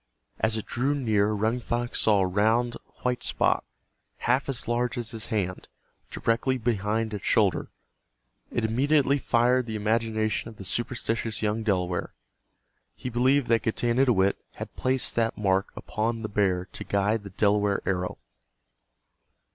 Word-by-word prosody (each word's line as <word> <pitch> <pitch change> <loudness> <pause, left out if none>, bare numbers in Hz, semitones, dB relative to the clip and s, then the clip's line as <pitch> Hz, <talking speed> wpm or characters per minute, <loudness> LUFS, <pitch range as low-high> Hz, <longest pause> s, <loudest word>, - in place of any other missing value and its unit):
As 110 0 +1
it 110 - -4
drew 135 +4 0
near 110 -6 +2
Running 110 +3 0
Fox 120 0 -2
saw 105 -3 +4
a - - +3
round 110 +6 +2 0.3
white 125 -1 0
spot, - - +2 0.6
half 130 +3 +2
as 135 - -3
large 120 +2 0
as 115 -2 -3
his 110 -3 -6
hand, 100 -5 -2 0.4
directly 115 +3 0
behind 110 -1 -1
its 105 - -4
shoulder. - - +2 0.8
It 120 - -1
immediately 140 +4 +2
fired 125 0 +2
the 110 - -4
imagination 110 +1 0
of 110 - -12
the 100 - -9
superstitious 115 +1 -1
young 105 +1 0
Delaware. 90 -5 -1 0.8
He 125 - -5
believed 130 +3 +3
that 115 -2 +4
Getanittowit 115 -3 +2 0.2
had - - -8
placed 130 0 0
that 115 -1 +1
mark 95 -2 +1
upon 115 +1 -2
the 110 - -3
bear 95 -3 +1
to - - -6
guide 100 +2 +1
the 100 - -8
Delaware 100 +1 +1
arrow. 90 -1 -1
110 Hz, 145 wpm, -27 LUFS, 105-120 Hz, 0.8 s, saw